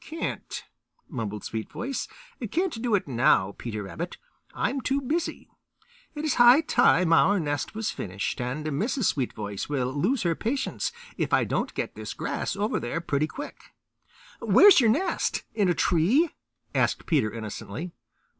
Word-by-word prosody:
"Can't," 325 +1 -5 0.4
mumbled 110 - -4
Sweetvoice. 235 - -4 0.4
"Can't 335 - -1
do 235 -3 +2
it 190 - -1
now, 115 -6 +3
Peter 110 -3 -4
Rabbit. 170 - -6 0.3
I'm 275 - -1
too 270 +2 0
busy. 310 +6 -2 0.7
It 295 +1 -3
is 300 - +2
high 245 +5 +8
time 180 - +4
our 200 +4 +5
nest 145 +3 -2
was 220 0 -1
finished, 100 +5 -4
and 130 +5 -3
Mrs. 205 - -1
Sweetvoice 105 -7 -4
will 130 -3 -1
lose 205 - +1
her 170 -2 +2
patience 260 - -2 0.3
if - - -1
I - - +5
don't - - -2
get - - -3
this - - -7
grass - - -2
over 205 +2 0
there 120 +8 -3
pretty 155 -2 0
quick." 285 - -9 0.6
"Where 410 - +7
is 360 - +7
your 230 - +4
nest; 310 - 0
in 205 -4 +2
a 175 - +2
tree?" 215 - +3 0.4
asked - - +1
Peter 140 -10 +2
innocently. 115 - -6
175 Hz, 155 wpm, -26 LUFS, -, 0.7 s, high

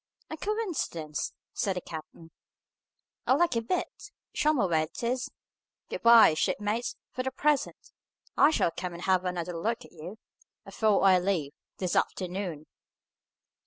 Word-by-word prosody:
"A 315 - -4
coincidence!" 335 - -3 0.2
said 195 -2 -1
the 180 - -3
captain. 165 0 -10 1.0
"A 260 - +5
lucky 330 -8 +2
bit! 230 +11 -3 0.2
Show 305 - +3
me 260 -10 +2
where 160 -3 +2
it 170 - -10
is. 250 +2 -1 0.6
Good - - -4
bye, 230 -7 +8
shipmates, 210 +8 -1 0.2
for 255 - -3
the 260 - -1
present! 295 +2 -1 0.4
I 290 - +6
shall 240 - +2
come 180 +1 -5
and 170 +1 -8
have 185 -1 +2
another 180 -1 -3
look 225 +8 -2
at - - -17
you, 175 +6 -9 0.5
afore 215 -3 +2
I 190 -2 +6
leave, 175 -6 -1 0.2
this 185 -2 -2
afternoon." 180 -4 -2
195 Hz, 145 wpm, -29 LUFS, 170-245 Hz, 1.0 s, bye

